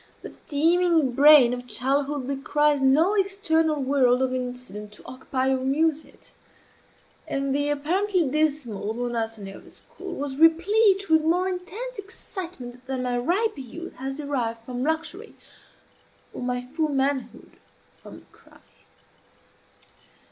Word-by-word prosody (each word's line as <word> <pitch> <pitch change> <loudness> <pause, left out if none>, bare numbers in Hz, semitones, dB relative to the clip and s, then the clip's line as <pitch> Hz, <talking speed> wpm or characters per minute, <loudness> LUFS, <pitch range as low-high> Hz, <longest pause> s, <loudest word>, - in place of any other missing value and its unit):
The - - -9
teeming 325 -1 +3
brain 280 -2 +7
of 250 0 -6
childhood 275 +4 -1
requires 290 +1 +1
no 300 +9 +4
external 370 -6 +1
world 260 -2 +3
of 255 -1 -1
incident 250 -5 -6
to - - -17
occupy 260 +1 -2
or 265 - +1
amuse 295 +4 +1
it; - - -18 1.0
and 275 0 -1
the 290 +1 0
apparently 350 +4 0
dismal 260 -8 -1
monotony 225 -4 -3
of - - -12
a - - -16
school 375 -2 -10
was 280 -3 -5
replete 390 +5 +4
with 320 -1 +4
more 355 +4 +2
intense 405 +7 -5
excitement 350 - -9
than 260 -1 -3
my 250 -1 -1
riper 350 - 0
youth 330 +7 -8
has 270 +1 -4
derived 240 -6 -3
from 245 0 -5
luxury, 325 - -3 1.0
or - - -7
my 250 0 -2
full 305 +5 -2
manhood 275 -1 -2 0.4
from - - -14
crime. - - -21
285 Hz, 130 wpm, -25 LUFS, 250-330 Hz, 1.0 s, brain